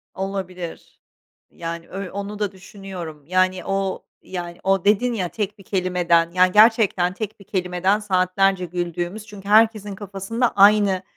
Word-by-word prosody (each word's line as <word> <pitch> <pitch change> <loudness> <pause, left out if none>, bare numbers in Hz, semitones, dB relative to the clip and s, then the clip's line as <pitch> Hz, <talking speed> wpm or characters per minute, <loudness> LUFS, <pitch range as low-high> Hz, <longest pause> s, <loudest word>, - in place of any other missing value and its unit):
Olabilir, 185 -3 -6 0.5
yani 170 0 -7
ö 195 -1 -6
onu 200 +1 -6
da 205 -2 -1
düşünüyorum 185 -5 -9
yani 185 0 +1
o 195 -1 -2 0.2
yani 175 -2 -6
o 195 -1 +1
dedin 220 +4 +3
ya 185 -6 -2
tek 210 +1 -4
bir 195 - -15
kelimeden 180 -3 +1
yani 185 +1 +4
gerçekten 210 -4 +4
tek 215 +1 -6
bir 200 - -15
kelimeden 180 +2 0
saatlerce 190 -1 +1
güldüğümüz 175 +4 -4
çünkü 200 -1 -10
herkesin 215 -2 +3
kafasında 205 +5 -2
aynı, 200 -1 +5
195 Hz, 140 wpm, -22 LUFS, 180-205 Hz, 0.5 s, aynı